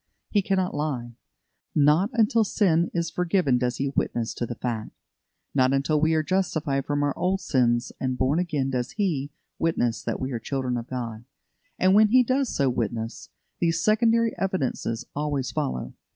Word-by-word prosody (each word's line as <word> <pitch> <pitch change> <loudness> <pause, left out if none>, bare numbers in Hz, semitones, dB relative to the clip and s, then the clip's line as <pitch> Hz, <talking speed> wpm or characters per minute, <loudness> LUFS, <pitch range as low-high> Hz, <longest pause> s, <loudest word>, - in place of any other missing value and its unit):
He 205 - +3
cannot 190 -1 0
lie. 130 -6 -3 0.6
Not 150 +7 +4
until 225 0 +3
sin 175 -5 +2
is 170 -1 -2
forgiven 175 -8 +1
does 125 0 -1
He 140 0 -1
witness 120 -4 -1
to 120 - -3
the 120 - -5
fact. 115 -3 -3 0.6
Not 130 -1 +3
until 145 +2 +1
we 160 +1 +3
are 155 - +2
justified 155 -6 -1
from 145 0 0
our 145 -1 0
old 190 +2 0
sins 120 -5 +1
and 130 -1 -1
born 135 +6 +2
again 150 -7 -1
does 125 -1 -2
He 160 -10 -1 0.3
witness 120 -8 0
that - - -3
we 130 +1 -3
are 120 - -2
children 130 +1 -2
of 120 0 -4
God; 120 -3 -5 0.5
and 185 +1 +4
when 215 +1 +7
He 250 +4 +5
does 260 +1 +1
so 140 - +1
witness, 115 -2 -3 0.3
these 165 -1 +1
secondary 230 +1 +3
evidences 130 -10 -2
always 145 -3 -1
follow. 65 -1 -3
145 Hz, 170 wpm, -25 LUFS, 125-185 Hz, 0.6 s, when